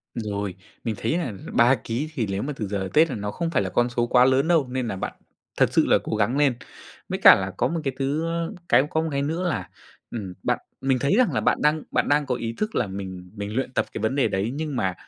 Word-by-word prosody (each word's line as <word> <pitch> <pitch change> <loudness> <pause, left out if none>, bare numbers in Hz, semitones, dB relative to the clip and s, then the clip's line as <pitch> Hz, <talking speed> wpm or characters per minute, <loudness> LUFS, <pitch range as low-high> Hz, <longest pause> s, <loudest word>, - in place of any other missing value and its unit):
Rồi, 100 -4 -3 0.3
mình 115 -2 -2
thấy 160 - 0
là 155 -11 -2 0.2
3 120 +3 +5
ký 125 +7 -3
thì 120 -8 -1
lếu 100 0 -2
mà 145 +2 -3
từ 110 -5 -4
giờ 100 0 -2
đến 95 - -4
Tết 160 +2 +5
là - - -3
nó 105 -1 -4
không 165 +10 -2
phải 135 -6 +1
là - - -2
con 120 0 +1
số 120 0 0
quá 125 +1 +5
lớn 130 +3 +3
đâu, 165 -6 +3
nên 125 -1 -2
là 105 - -3
bạn 95 - -4 0.4
thật - - +3
sự - - +4
là - - +5
cố - - -2
gắng 110 +5 +1
lên. 145 -3 +4 0.6
Với - - -2
cả - - +10
là 95 0 -3
có 120 - +2
một 165 +3 -2
cái 135 -3 -1
thứ 145 +4 0
ơ, 170 +2 -2 0.2
cái 120 +2 +6
có 160 - +1
một 160 - -2
cái 140 -1 0
nữa 165 +5 -1
là, - - -3 0.4
ừm, 100 -6 -5
bạn - - +1 0.2
mình 130 -1 +1
thấy 140 +8 +2
rằng 255 - +3
là - - +1
bạn - - +1
đang 150 +1 +2
bạn - - +1
đang 145 0 +3
có 125 -2 -1
ý 115 -1 -4
thức 215 +1 -2
là 120 - +1
mình 95 -2 -7
mình 105 +1 -5
luyện 130 -1 -1
tập - - +1
cái - - -4
vấn 110 +4 0
đề 140 - +3
đấy, 100 +4 -1
nhưng 155 -2 -3
mà 95 -6 0
125 Hz, 280 wpm, -24 LUFS, 105-150 Hz, 0.6 s, cả